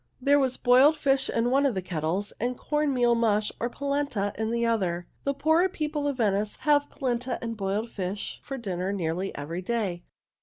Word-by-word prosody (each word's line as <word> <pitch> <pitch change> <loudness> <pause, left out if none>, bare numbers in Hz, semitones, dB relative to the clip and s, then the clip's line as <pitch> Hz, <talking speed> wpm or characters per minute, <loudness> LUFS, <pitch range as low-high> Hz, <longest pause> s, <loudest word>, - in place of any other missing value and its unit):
There 285 +2 +4
was 260 -2 +1
boiled 260 +5 +5
fish 270 -2 +2
in 235 +1 +1
one 275 +2 +4
of 270 -6 +2
the 190 - -1
kettles 175 +4 -2
and 245 +2 -1
corn 300 -1 0
meal 245 -2 +3
mush, 215 -3 +2
or 240 - -1
polenta, 280 -7 -1
in 220 0 -2
the 235 0 0
other 205 -7 +1
one. 175 0 -8 0.2
The 280 - +1
poorer 320 +5 +4
people 300 -4 -2
of 280 -3 -2
Venice 210 -2 +1
have 290 -1 +3
polenta 250 -2 -2
and 230 -1 -4
boiled 205 +3 -2
fish 195 +1 -4
for 270 - -6
dinner 190 -5 -3
nearly 185 0 -2
every 160 +5 -4
day. 195 -4 -2
235 Hz, 195 wpm, -27 LUFS, 195-275 Hz, 0.2 s, boiled